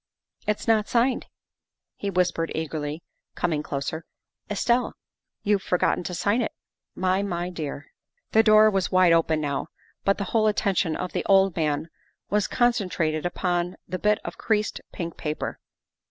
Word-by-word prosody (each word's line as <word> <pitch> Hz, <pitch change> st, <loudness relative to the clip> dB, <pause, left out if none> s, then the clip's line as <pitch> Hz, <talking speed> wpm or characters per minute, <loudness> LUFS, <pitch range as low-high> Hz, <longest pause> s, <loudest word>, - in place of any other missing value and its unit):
" -, -, -35 dB
It's 210 Hz, +2 st, -1 dB
not 220 Hz, -2 st, +3 dB
signed," 245 Hz, +2 st, +1 dB, 0.7 s
he 200 Hz, -, -3 dB
whispered 180 Hz, -3 st, 0 dB
eagerly, 155 Hz, 0 st, -3 dB, 0.3 s
coming 160 Hz, -4 st, 0 dB
closer. 150 Hz, +3 st, -4 dB, 0.2 s
" -, -, -47 dB
Estelle, 235 Hz, +4 st, +1 dB, 0.5 s
you've 205 Hz, -1 st, +2 dB
forgotten 180 Hz, -1 st, +1 dB
to 180 Hz, -, -3 dB
sign 205 Hz, +7 st, +1 dB
it, 225 Hz, -, -1 dB, 0.4 s
my 185 Hz, +1 st, +1 dB
my 180 Hz, -2 st, -2 dB
dear." 145 Hz, -4 st, -6 dB, 0.4 s
The 220 Hz, -, +6 dB
door 215 Hz, -1 st, +6 dB
was 195 Hz, -2 st, 0 dB
wide 185 Hz, -2 st, +5 dB
open 160 Hz, -1 st, +3 dB
now, 145 Hz, -1 st, -2 dB, 0.4 s
but 195 Hz, -, +2 dB
the 200 Hz, -, -2 dB
whole 220 Hz, -2 st, +4 dB
attention 190 Hz, -6 st, +1 dB
of 180 Hz, -, -4 dB
the -, -, -2 dB
old 195 Hz, -2 st, +4 dB
man 155 Hz, -1 st, 0 dB, 0.4 s
was 210 Hz, -1 st, +2 dB
concentrated 180 Hz, -10 st, +1 dB
upon 175 Hz, 0 st, -1 dB
the 185 Hz, -, -4 dB
bit 210 Hz, 0 st, +3 dB
of -, -, -6 dB
creased 215 Hz, -1 st, 0 dB
pink 170 Hz, -3 st, -5 dB
paper. 150 Hz, 0 st, -4 dB
185 Hz, 155 wpm, -25 LUFS, 165-210 Hz, 0.7 s, The